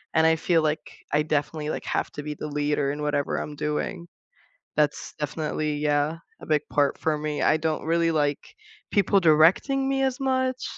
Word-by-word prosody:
and 160 - +5
I 160 - +4
feel 165 0 +2
like, 155 0 -3
I 150 - +3
definitely, 150 0 -1
like, - - -4
have - - -1
to 145 - -6
be 150 0 -4
the 150 - -6
leader 145 -1 0
in 145 +1 -5
whatever 145 -1 0
I'm 150 - -5
doing. 150 +4 -3 0.7
That's 150 -1 0
definitely 150 0 -2
yeah, 150 +2 +1 0.2
a - - -9
big 150 -2 +2
part 145 -1 +2
for 155 -1 0
me. 150 0 -3
I 155 - +4
don't 160 0 -2
really 165 +1 +2
like 145 - -1 0.4
people 200 -1 +3
directing 175 - +4
me 270 0 +1
as 265 -1 -1
much. 260 -1 0
155 Hz, 185 wpm, -25 LUFS, 150-170 Hz, 0.7 s, and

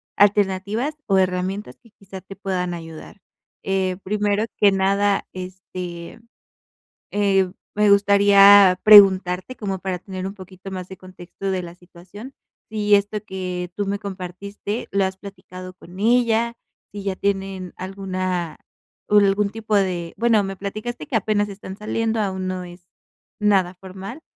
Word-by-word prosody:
alternativas 205 +6 +1
o 195 - +3
herramientas 185 +2 -1
que 235 - -22
quizá 195 -2 -12
te 195 +1 -11
puedan 185 -3 -3
ayudar. 165 +3 -10 0.4
Eh, 190 -1 -1
primero 210 +1 0
que 205 -1 +6
nada, 195 +1 +1
este, 180 0 -8 0.9
eh, 195 -2 +2 0.2
me 210 0 +3
gustaría 200 -1 +7
preguntarte, 195 +1 +6
como 195 -3 -3
para 185 -1 -3
tener 185 0 -7
un 195 +1 -5
poquito 190 0 -11
más 185 -1 -6
de 190 - -9
contexto 185 +1 -7
de 185 -1 -2
la 170 0 -9
situación, 180 +8 -13 0.4
si 210 -1 +3
esto 205 +1 -1
que 180 -2 -5
tú 205 - -2
me 200 +1 -2
compartiste 200 +2 -6
lo 200 0 +2
has 190 0 -4
platicado 185 -2 -10
con 180 0 -14
ella, 235 +1 +2 0.4
si 205 0 -7
ya 195 -1 -2
tienen 195 -2 -3
alguna 185 -3 -4 0.5
ul 205 -1 +6
algún 200 +1 +1
tipo 220 0 -3
de 180 -4 0
bueno 225 -3 +3
me 195 0 -5
platicaste 205 -1 -6
que - - -4
apenas 205 0 0
están 195 -1 -9
saliendo, 225 +1 -1
aún 190 -3 -2
no 185 0 -3
es 175 0 -13 0.5
nada 195 -4 +2
formal, 195 - -9
195 Hz, 145 wpm, -22 LUFS, 185-205 Hz, 0.9 s, gustaría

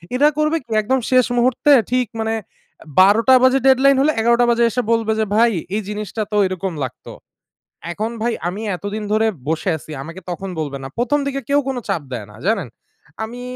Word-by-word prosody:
এরা 295 +3 +5
করবে 305 +2 +1
কি? - - -51
একদম 260 +5 0
শেষ 255 -1 +5
মুহূর্তে 255 +4 +2 0.2
ঠিক 250 -2 +1
মানে 220 0 -1
এ - - -24 0.6
১২:০০ 215 +7 +5
বাজে 260 +1 +5
ডেডলাইন 270 +1 +5
হলে, 305 - +3
১১:০০ 235 +1 +3
বাজে 235 0 +3
এসে 250 +3 -1
বলবে 225 -1 +1
যে, 220 - +2
"ভাই, 230 +1 +4 0.2
এই 215 - 0
জিনিসটা 210 +1 -4
তো 210 - 0
এরকম 185 -1 -4
লাগতো।" 130 - -7 0.8
এখন 215 +6 -3
ভাই 235 0 +1 0.2
আমি 195 +4 -5 0.2
এতদিন 205 +3 -5
ধরে 220 +1 +3 0.2
বসে 165 +3 0
আছি। 155 - -13
আমাকে 165 +5 -9
তখন 190 +2 -5
বলবে 140 -2 -4
না। 135 - -6
প্রথম 250 +5 +1
দিকে 275 0 -2
কেউ 285 +1 +3
কোনো 260 -2 -2
চাপ 160 - -1
দেয় 110 -5 -5
না। 105 - -16
জানেন? 200 - 0 0.6
আমি 245 +2 -9
225 Hz, 195 wpm, -19 LUFS, 195-255 Hz, 0.8 s, এরা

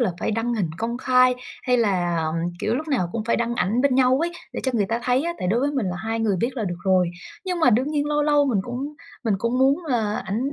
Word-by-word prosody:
là 230 -7 +1
phải - - 0
đăng 230 +2 -1
hình 190 -8 -1
công 235 +2 -2
khai, 255 -1 +4 0.3
hay 250 -1 +2
là, 185 -7 +1
ừm, 155 - -2 0.3
kiểu, 220 - 0
lúc 310 +5 -3
nào 245 - 0
cũng 225 -2 -3
phải 235 - +1
đăng 235 0 -1
ảnh 230 +2 +1
bên 280 -1 +3
nhau 255 0 +4
ấy, 340 +1 -1 0.2
để - - -4
cho 260 - 0
người 205 -4 +2
ta 230 +3 -1
thấy 250 +2 +2
á. 340 +2 -1
Tại 180 - -2
đối 225 +6 +2
với 285 +2 +1
mình 265 -8 -1
là 180 -1 -2
hai 225 +3 -3
người 210 -4 +1
biết 240 +8 -2
là 225 - -1
được 175 -3 -3
rồi. 185 -2 +3 0.3
Nhưng 365 -2 -2
mà 255 - +5
đương 250 +6 +2
nhiên 295 -1 0
lâu 295 0 +1
lâu 295 -1 +3
mình 240 -7 +1
cũng 255 +7 -5 0.3
mình 220 -3 +2
cũng 235 +5 0
muốn 275 +6 +3
là 225 -8 0
ảnh 240 +8 -2
240 Hz, 280 wpm, -23 LUFS, 215-270 Hz, 0.3 s, mà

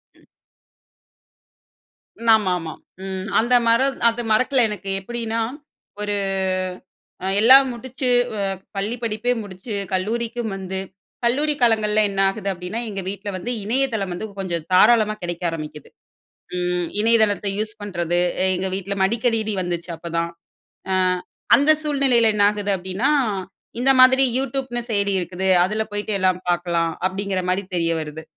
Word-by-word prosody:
ம். - - -25 2.0
ஆமாமா. 180 -7 +2 0.3
ம், 190 0 -5
அந்த 240 +3 +1
மர 230 +2 +4 0.3
அந்த 230 +1 -3
மறக்கல 255 +3 +3
எனக்கு 200 -2 -6
எப்படின்னா, 230 +2 -3 0.6
ஒரு 205 0 -1 1.1
அ - - -1
எல்லா 255 +5 +9 0.2
முடிச்சு, 255 +2 -4 0.5
வ - - -8 0.2
பள்ளி 205 +4 -1
படிப்பே 225 +2 -1
முடிச்சு, 200 +3 -8 0.2
கல்லூரிக்கும் 225 +4 -2
வந்து, 190 0 -5 0.5
கல்லூரி 290 +5 +2
காலங்கள்ல 215 -2 +3
என்ன 195 - -4
ஆகுது 200 0 -4
அப்படின்னா, 180 +6 -5
எங்க 195 -2 -4
வீட்ல 200 +1 -5
வந்து 235 +7 -4
இணையதளம் 225 -4 0
வந்து 175 - -5
கொஞ்சம் 170 -4 -3
தாராளமா 215 +2 +5
கிடைக்க 175 0 -5
ஆரம்பிக்குது. 155 -2 -7 0.7
ம் 180 -1 -1
இணையதளத்தை 215 -3 +3
யூஸ் 215 0 -2
பண்றது. 175 -3 -1 0.4
எங்க 190 +1 -2
வீட்ல 195 +1 -3
மடிகணினி 225 0 +1
வந்துச்சு 175 -1 -4
அப்பதான், 170 0 -3 0.6
அ - - +2 0.6
அந்த 285 +2 +4
சூழ்நிலைல 270 -6 +2
என்னாகுது 205 0 +2
அப்படின்னா, 190 +6 -2 0.7
"இந்த 270 +2 +4
மாதிரி 260 +1 +6
யூடியூப்னு 265 -2 -2
செய்தி 200 -1 +1
இருக்குது, 185 +1 -3 0.2
அதுல 210 +4 -1
போய்ட்டு 205 +1 -2
எல்லா 185 0 +4 0.2
பார்க்கலாம்" 170 -1 0 0.2
அப்படிங்கிற 195 0 -3
மாரி 190 +2 0
தெரிய 165 -1 +1
வருது. 155 +1 -7
205 Hz, 125 wpm, -21 LUFS, 185-235 Hz, 2.0 s, எல்லா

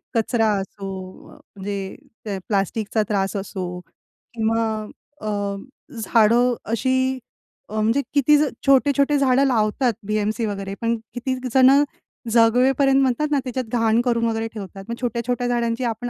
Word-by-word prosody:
कचरा 225 0 +2
असो 190 -1 -8
म्हणजे 195 -1 -6 0.3
ते 200 -2 -3
प्लास्टिकचा 210 +2 0
त्रास 195 -1 0
असो, 185 -2 -5 0.5
किंवा 225 0 +1 0.6
अ, 215 - -5 0.8
झाडं 235 +3 +4 0.2
अशी 260 +2 +1 0.5
अ, 215 - -7
म्हणजे 230 +6 +2
किती 290 +1 +5 0.3
छोटे-छोटे 280 +1 +4
झाडं 270 0 +3
लावतात 240 0 +1
बी-एम-सी 215 +2 0
वगैरे 195 -2 -4
पण 230 0 +1 0.2
किती 255 +1 -2 0.2
जण 260 0 +7 0.6
जगवेपर्यंत 255 +4 +4
म्हणतात 270 +4 +1
ना 290 - +3
त्याच्यात 255 -1 -3
घाण 225 +1 +3
करून 235 -2 +1
वगैरे 225 0 -1
ठेवतात. 195 -2 -8
मग 235 - -2
छोट्या-छोट्या 245 +1 -1
झाडांची 235 0 0
आपण 240 +1 -2
230 Hz, 125 wpm, -22 LUFS, 210-255 Hz, 0.8 s, जण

